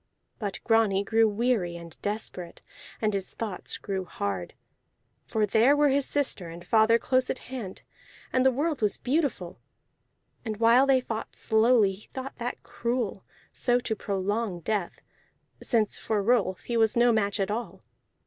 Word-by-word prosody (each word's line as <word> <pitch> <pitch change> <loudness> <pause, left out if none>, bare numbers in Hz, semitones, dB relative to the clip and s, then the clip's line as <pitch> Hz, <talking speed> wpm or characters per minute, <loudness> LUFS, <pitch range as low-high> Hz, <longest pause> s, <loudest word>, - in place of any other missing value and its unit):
But 200 -5 -3
Grani 220 -4 +3
grew 225 +2 +3
weary 210 -5 0
and 170 -1 -10
desperate, 205 -4 -5 0.4
and 215 -1 +2
his 195 -1 -4
thoughts 210 -5 -3
grew 190 -2 -3
hard. 100 - -4 0.7
For 215 -1 +1
there 225 +7 +4
were 295 0 +4
his 275 0 +2
sister 260 -11 -1
and 170 +1 -10
father 225 +1 +4
close 255 +1 +1
at - - -1 0.2
hand, 210 -8 -6 0.5
and 255 - +3
the 265 - +6
world 295 +2 -1
was 210 -2 +1
beautiful. 255 - -1 0.8
And 220 -3 -4
while 235 +4 +5
they 265 -1 +4
fought 225 -3 -5
slowly 220 -2 +3
he 195 +3 -14
thought 265 +1 -6
that 245 +1 -4
cruel, 235 -5 -3 0.3
so 245 -1 +2
to 225 -2 -2
prolong 200 -1 -2
death, 200 0 -2 0.6
since 225 -4 0
for 210 -2 -1
Rolf 205 -5 +1
he 240 - -4
was 225 0 +3
no 240 0 +5
match 205 -2 0
at 195 +1 0
all. 230 +3 -5
220 Hz, 160 wpm, -27 LUFS, 195-245 Hz, 0.8 s, the